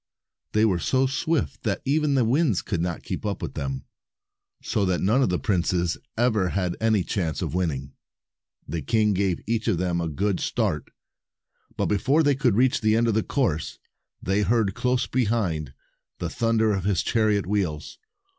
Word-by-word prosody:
They 110 +1 +4
were 95 -5 +2
so 130 +8 +2
swift 145 +4 -1
that 105 -4 -2
even 145 +1 +2
the 130 -3 +3
winds 130 - +2
could 85 -5 -2
not 85 -1 -3
keep - - -5
up - - -2
with - - -5
them, 70 -1 -4 0.8
so 105 - 0
that 90 -2 +1
none 110 +8 +2
of 130 - +2
the 90 - +1
princes 90 -4 0 0.2
ever 110 -6 +2
had 90 -2 -1
any 110 -4 +3
chance 85 -6 -2
of - - -3
winning. 75 -7 -2 0.7
The 80 +2 -3
king 105 - +2
gave 95 -2 0
each 115 +1 -1
of 105 -6 +2
them 85 -1 0
a 85 - -2
good 95 +5 -1
start, - - -1 0.9
but - - 0
long - - 0
before 145 +8 +3
they 145 -1 +4
reached 130 -1 +2
the 110 -1 +3
end 115 +1 +2
of - - +2
the 110 - +2
course, 95 - -1 0.5
they 95 +2 +1
heard, 105 -1 +2
close 125 +2 0
behind, 100 - -1 0.5
the - - -4
thunder 115 -1 +2
of 95 -2 -2
his 95 -4 +1
chariot 110 -3 +1
wheels. 90 -6 -2
105 Hz, 180 wpm, -25 LUFS, 90-120 Hz, 0.9 s, They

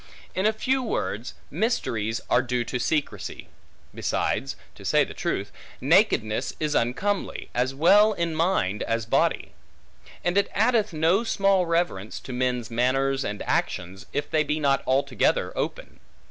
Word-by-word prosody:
In 205 +4 +2
few 260 +5 0
words, 125 - -3 0.2
mysteries 120 - -1
are 120 - +4
due 125 -1 -1
to 125 +2 -3
secrecy. 150 +4 -2 0.4
Besides 70 - -1 0.2
(to - - -14
say - - +3
truth) - - -3 0.3
nakedness 110 0 +2
is 155 -1 -1
uncomely, 185 +13 -1
as 130 +2 0
well 205 +8 +6
in 170 -3 -1
mind 155 - +1
as 115 -1 -1
body; 115 - +1 0.7
and 175 +3 +2
it 200 - 0
addeth 220 -1 +2
no 165 +7 +2
small 195 -5 +2
reverence, 165 - -1
to 130 - -7
men's 125 -2 -1
manners 135 +3 +1
and 105 - -4
actions, 90 +3 -2
if 145 - -2
they 155 -1 +2
be 150 +1 -1
not 140 -2 +2
altogether 135 -1 +1
open. - - -4
140 Hz, 140 wpm, -25 LUFS, 120-190 Hz, 0.7 s, well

